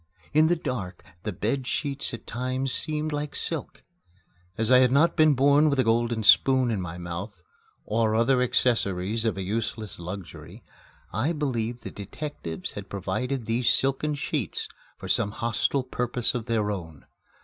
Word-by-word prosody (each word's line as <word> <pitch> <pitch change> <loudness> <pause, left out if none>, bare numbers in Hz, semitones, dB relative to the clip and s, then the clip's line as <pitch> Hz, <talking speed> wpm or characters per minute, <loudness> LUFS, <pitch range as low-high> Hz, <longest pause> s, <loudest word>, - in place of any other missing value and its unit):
In 155 +1 +5
the 175 - +3
dark, 120 - -5 0.2
the 105 - -3
bed 115 +7 -2
sheets 140 -1 -1
at 115 -3 -8
times 130 +2 -1
seemed 155 0 0
like 150 0 -3
silk. 160 -5 -4 0.7
As 115 +1 0
I 125 - +8
had 130 -1 +5
not 155 +5 +4
been 155 -3 +5
born 145 +3 +5
with 140 -2 0
a - - +5
golden 115 0 +1
spoon 130 +3 +5
in 105 -4 -1
my 85 -1 -6
mouth, 90 +2 -6 0.4
or 110 0 +1
other 125 +3 +3
accessories 110 -4 +1
of 110 -3 0
a 95 - -2
useless 110 0 -3
luxury, 90 +1 -8 0.5
I 125 - 0
believed 120 -6 -2
the - - -6
detectives 100 - -6
had 100 -1 -8
provided 110 +7 -2
these 115 +2 +1
silken 135 +3 +1
sheets 145 - -2 0.3
for - - -8
some - - +2
hostile 120 +4 0
purpose 125 -1 -1
of 120 -1 -4
their 110 -3 +1
own. 80 -7 -7
120 Hz, 160 wpm, -26 LUFS, 105-135 Hz, 0.7 s, I